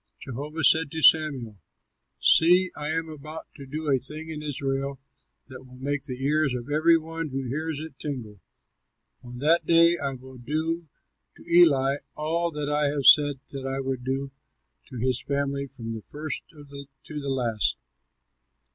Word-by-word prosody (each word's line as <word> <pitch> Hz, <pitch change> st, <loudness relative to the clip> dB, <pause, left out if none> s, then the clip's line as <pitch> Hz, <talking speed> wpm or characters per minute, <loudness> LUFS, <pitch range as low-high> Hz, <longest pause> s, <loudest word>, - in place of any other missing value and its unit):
Jehovah 150 Hz, +5 st, -6 dB
said 160 Hz, -2 st, +5 dB
to 160 Hz, -, -3 dB
Samuel, 135 Hz, -10 st, +4 dB, 0.6 s
"See, 180 Hz, +3 st, +5 dB
I 150 Hz, 0 st, -3 dB
am 165 Hz, +1 st, -1 dB
about 155 Hz, +1 st, -9 dB
to 140 Hz, -2 st, -11 dB
do 155 Hz, +3 st, -5 dB
a 135 Hz, -2 st, +3 dB
thing 155 Hz, +5 st, -2 dB
in 150 Hz, -1 st, -6 dB
Israel 135 Hz, -2 st, -3 dB, 0.5 s
that 130 Hz, -1 st, -11 dB
will 125 Hz, -1 st, -15 dB
make 140 Hz, +1 st, -2 dB
the 130 Hz, -1 st, -4 dB
ears 150 Hz, -2 st, +2 dB
of 125 Hz, +3 st, -6 dB
every 165 Hz, +3 st, +5 dB
one 165 Hz, 0 st, -5 dB
who 135 Hz, 0 st, -4 dB
hears 155 Hz, +3 st, -3 dB
it 155 Hz, -3 st, -9 dB
tingle. 115 Hz, -9 st, -6 dB, 0.8 s
On 125 Hz, 0 st, -10 dB
that 160 Hz, +6 st, +2 dB
day 170 Hz, +1 st, +5 dB
I 140 Hz, -1 st, -1 dB
will 130 Hz, 0 st, -13 dB
do 160 Hz, +6 st, -2 dB, 0.5 s
to -, -, -15 dB
Eli 140 Hz, -6 st, +5 dB, 0.2 s
all 165 Hz, +3 st, 0 dB
that 150 Hz, -2 st, -4 dB
I 150 Hz, 0 st, +1 dB
have 140 Hz, -1 st, -2 dB
said 145 Hz, -3 st, +6 dB
that 135 Hz, -1 st, -5 dB
I 135 Hz, 0 st, -2 dB
would 135 Hz, -2 st, -3 dB
do 135 Hz, +1 st, -3 dB, 0.6 s
to 130 Hz, -, -9 dB
his 125 Hz, +1 st, 0 dB
family 140 Hz, 0 st, -2 dB
from 115 Hz, -4 st, -7 dB
the 110 Hz, -, -6 dB
first 155 Hz, +1 st, -6 dB
to 150 Hz, -4 st, -14 dB, 0.6 s
the 140 Hz, -1 st, -5 dB
last. 120 Hz, -5 st, 0 dB
145 Hz, 165 wpm, -26 LUFS, 130-155 Hz, 0.8 s, said